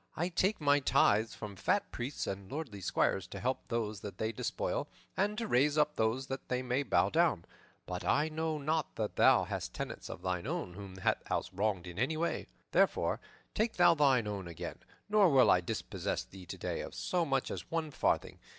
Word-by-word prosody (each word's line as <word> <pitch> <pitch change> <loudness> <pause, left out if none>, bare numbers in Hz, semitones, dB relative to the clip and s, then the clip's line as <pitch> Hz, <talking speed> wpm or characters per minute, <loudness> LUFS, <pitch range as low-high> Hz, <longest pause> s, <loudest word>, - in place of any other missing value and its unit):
I 175 +3 0
take 190 +4 +1
my 145 -1 +4
tithes 110 -5 +3
from 105 -2 -7
fat 200 - 0
priests 125 +4 -3
and 95 +2 -5
lordly 135 -9 -5
squires, 95 0 +1
to - - -7
help 130 +1 -2
those 110 -3 -2
that 100 - -7
they 110 0 -1
despoil - - -2 0.3
and 205 +2 +1
to 230 -1 -2
raise 145 +2 +3
up 150 0 +3
those 115 +4 +1
that 135 0 -6
they 125 0 0 0.2
bow 140 - +3
down; 165 - +2 0.4
but 90 0 -4
I 150 +1 +2
know 160 0 -2
not 155 +1 -1
that 110 -2 -2
thou - - +6
hast - - -4
tenants - - -5
of - - -7
thine 90 +3 -1
own 160 - -3
whom 95 0 -9
thou 95 - +2
hast - - -2
wronged 100 -3 0
in 90 +2 -7
any 135 +6 +1
way. 170 +2 -1 0.2
Therefore, - - +2 0.3
take 225 +1 +1
thou - - +6
thine 135 -7 +4
own 100 -3 -4
again, 85 -2 -6 0.3
nor 205 -3 +5
will 135 -4 +6
I 90 - +5
dispossess 85 - -3
thee 95 -2 -13
today - - -3
of - - -7
so 95 - 0
much 135 -4 0
as - - -6
one 165 -2 -2
farthing. - - 0
130 Hz, 195 wpm, -33 LUFS, 100-160 Hz, 0.4 s, thou